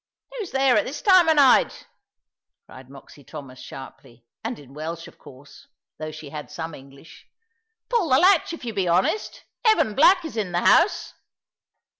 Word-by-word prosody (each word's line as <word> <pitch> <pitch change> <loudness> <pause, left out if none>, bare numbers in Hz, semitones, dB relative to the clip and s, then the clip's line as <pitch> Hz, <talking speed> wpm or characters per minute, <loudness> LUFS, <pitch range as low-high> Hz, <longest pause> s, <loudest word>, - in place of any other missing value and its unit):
"Who's 450 -7 -6
there 265 -3 +2
at 210 - +1
this 280 - -6
time 370 -6 +5
of 320 - +4
night?" 275 -4 +3 0.8
cried 130 0 -15
Moxy 140 +1 -15
Thomas, 135 -3 -11
sharply, 130 -3 -12 0.2
and 230 +2 -4
in 135 -2 -16
Welsh 165 +3 -7
of - - -18
course, 135 +2 -16 0.3
although 155 0 -5
she 155 -2 -11
had 150 0 -8
some 165 -1 -7
English; 140 +3 -15 0.6
"pull 460 -10 0
the 260 - +5
latch, 360 +2 +4
if 335 -6 -8
you 230 - -4
be 195 -3 -1
honest. 180 - -1 0.2
Evan 435 - +3
Black 355 - +4
is 315 - -7
in 195 -5 -3
the 175 - 0
house." 340 - +2
185 Hz, 170 wpm, -23 LUFS, -, 0.8 s, time